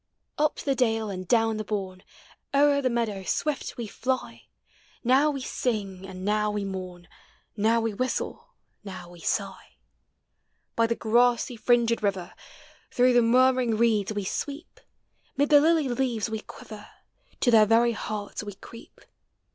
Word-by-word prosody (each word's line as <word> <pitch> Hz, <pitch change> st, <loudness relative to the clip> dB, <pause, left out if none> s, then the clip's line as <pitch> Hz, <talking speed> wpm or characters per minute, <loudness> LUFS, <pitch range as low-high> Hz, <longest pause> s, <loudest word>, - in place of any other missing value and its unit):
Up 300 Hz, 0 st, +2 dB
the 275 Hz, -, -1 dB
dale 225 Hz, -5 st, 0 dB
and 185 Hz, -1 st, -6 dB
down 225 Hz, -1 st, +2 dB
the 215 Hz, -, -3 dB
bourne, 190 Hz, -3 st, -4 dB, 0.5 s
O'er 285 Hz, 0 st, +4 dB
the 255 Hz, -, +1 dB
meadow 230 Hz, -5 st, -1 dB
swift 295 Hz, +8 st, -2 dB
we 235 Hz, -, -4 dB
fly; 255 Hz, +4 st, -4 dB, 0.6 s
Now 265 Hz, +5 st, +4 dB
we 275 Hz, -2 st, -3 dB
sing, 200 Hz, -7 st, -3 dB
and 185 Hz, 0 st, -8 dB
now 210 Hz, 0 st, +1 dB
we 210 Hz, -1 st, -2 dB
mourn. 185 Hz, -2 st, -7 dB, 0.5 s
Now 225 Hz, +2 st, +2 dB
we 225 Hz, -1 st, -1 dB
whistle, 255 Hz, +5 st, -4 dB, 0.3 s
now 185 Hz, -3 st, -9 dB
we 175 Hz, -, -14 dB
sigh. -, -, -3 dB, 1.0 s
By 230 Hz, 0 st, +3 dB
the 230 Hz, -, 0 dB
grassy 240 Hz, +2 st, +2 dB
fringed 235 Hz, 0 st, +2 dB
river, 195 Hz, -4 st, -2 dB, 0.6 s
Through 250 Hz, 0 st, +3 dB
the 245 Hz, -, +5 dB
murmuring 250 Hz, -1 st, +3 dB
reeda 215 Hz, -3 st, +1 dB
we 205 Hz, -, -2 dB
sweep; 285 Hz, -, -5 dB, 0.6 s
Mid 285 Hz, +1 st, +2 dB
the 290 Hz, -2 st, +7 dB
lily 320 Hz, -2 st, +3 dB
lea 245 Hz, -1 st, -1 dB
ves 220 Hz, +1 st, -3 dB
we 220 Hz, -, -2 dB
quiver. 215 Hz, 0 st, -11 dB, 0.5 s
To 245 Hz, -, +3 dB
their 215 Hz, -2 st, +6 dB
very 230 Hz, +2 st, +4 dB
hearts 210 Hz, -2 st, -5 dB
we 205 Hz, -2 st, -7 dB
creep. 230 Hz, +4 st, -14 dB
225 Hz, 155 wpm, -26 LUFS, 205-255 Hz, 1.0 s, the